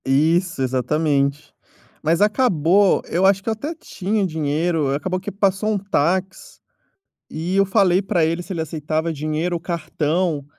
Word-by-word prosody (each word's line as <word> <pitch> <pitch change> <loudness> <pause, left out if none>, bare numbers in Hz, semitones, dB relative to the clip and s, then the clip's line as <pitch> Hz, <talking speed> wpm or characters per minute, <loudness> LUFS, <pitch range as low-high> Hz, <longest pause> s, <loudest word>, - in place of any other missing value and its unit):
Isso, 160 +4 +1
exatamente. 140 +2 0 0.5
Mas 165 +3 +1
acabou, 205 - +3
eu 180 +3 +1
acho 195 0 +3
que - - -2
eu - - +1
até 290 +10 -5
tinha 210 - -2
dinheiro, 155 -2 0
acabou 185 +5 -2
que - - -6
passou 200 +1 0
um 210 - +1
táxi 190 0 -2 0.7
e 170 +4 -3
eu 195 0 +4
falei 190 -2 +3
pra 185 -4 +1
ele 165 +2 -1
se 175 - -8
ele 170 - -3
aceitava 160 +1 -2
dinheiro 155 +3 -2
ou - - -6
cartão, 165 -1 -1
170 Hz, 155 wpm, -21 LUFS, 155-190 Hz, 0.7 s, eu